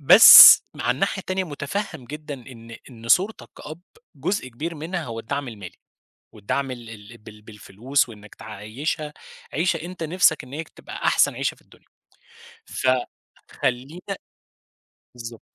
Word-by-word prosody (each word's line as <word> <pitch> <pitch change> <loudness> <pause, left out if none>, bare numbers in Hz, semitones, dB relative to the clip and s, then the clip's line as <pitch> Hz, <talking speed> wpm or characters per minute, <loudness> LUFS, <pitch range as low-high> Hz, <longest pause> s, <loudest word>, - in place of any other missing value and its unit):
بس 140 - +10
مع - - -2
الناحية 190 +9 -1
التانية 185 0 -3
مُتفهم 160 0 -6
جدًا 150 +2 -8
إن 115 -3 -13
إن 115 -1 -12
صورتك 195 - +1
كأب 155 +3 -10 0.3
جزء 190 -10 -3
كبير 155 +8 -6
منها 165 +2 -5
هو 115 -3 -7
الدعم 140 +3 -5
المالي، 100 -6 -11 0.6
والدعم 130 +6 -3
ال 120 -2 -9 0.2
ال 115 - -14
بال 105 -1 -15
بالفلوس 115 +5 -3
وإنّك 105 -2 -14
تعيّشها 115 +9 -6 0.4
عيشَة 170 +3 0
أنت 175 0 -9
نفْسك 160 0 +1
إن 125 - -16
هي 160 +3 -5
كانت - - -27
تبقى - - -10
أحسن - - +2
عيشَة - - -3
في - - -26
الدنيا، - - -24 0.8
فخلّينا 130 +6 -4 1.0
بالضبط. 115 -2 -10
135 Hz, 140 wpm, -22 LUFS, 115-160 Hz, 1.0 s, بس